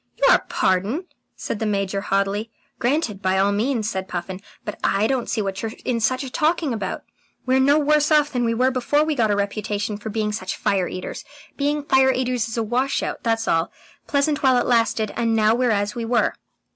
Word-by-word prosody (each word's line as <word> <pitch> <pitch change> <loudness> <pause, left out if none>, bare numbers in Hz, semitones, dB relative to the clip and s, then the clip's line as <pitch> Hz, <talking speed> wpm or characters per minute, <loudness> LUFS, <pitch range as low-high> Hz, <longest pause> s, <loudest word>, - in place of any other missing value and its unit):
"Your - - +6
pardon?" 200 - 0 0.3
said 205 - -4
the 220 - -1
Major 195 -1 -1
haughtily. 200 +2 -1 0.3
"Granted 240 -6 0
by 190 0 +1
all 195 +1 +3
means," 220 +1 0
said 190 -3 -3
Puffin. 185 +1 -5 0.2
"But 210 - -6
I 200 +2 +2
don't 255 0 -1
see 220 - 0
what 195 -1 -3
you're 225 -1 -4
in 240 -2 0
such 255 +4 0
a 265 - -6
taking 315 -3 +1
about. 200 -4 -4 0.4
We're 260 +1 +3
no 280 +3 +4
worse 300 0 +3
off 300 -1 +4
than 245 -2 -1
we 230 -1 +1
were 255 +3 +2
before 260 +4 +1
we 310 0 0
got 230 -6 +1
a 205 - +2
reputation 205 +1 -2
for 210 +1 -7
being 215 0 -1
such 190 -3 -4
fire 190 -3 +1
eaters. 185 - -6 0.3
Being 290 +1 -1
fire 265 -2 +4
eaters 250 -3 -1
is 225 - -5
a 230 - +1
wash 250 +5 0
out, - - -4
that's 225 -1 0
all. 165 +1 +1 0.4
Pleasant 285 0 +1
while 260 -2 +4
it 245 - +1
lasted, 230 -3 +1
and 230 -1 +1
now 215 0 +4
we're 245 +1 +1
as 205 -1 0
we 240 -1 -4
were." 235 +1 +1
225 Hz, 210 wpm, -22 LUFS, 205-265 Hz, 0.4 s, Your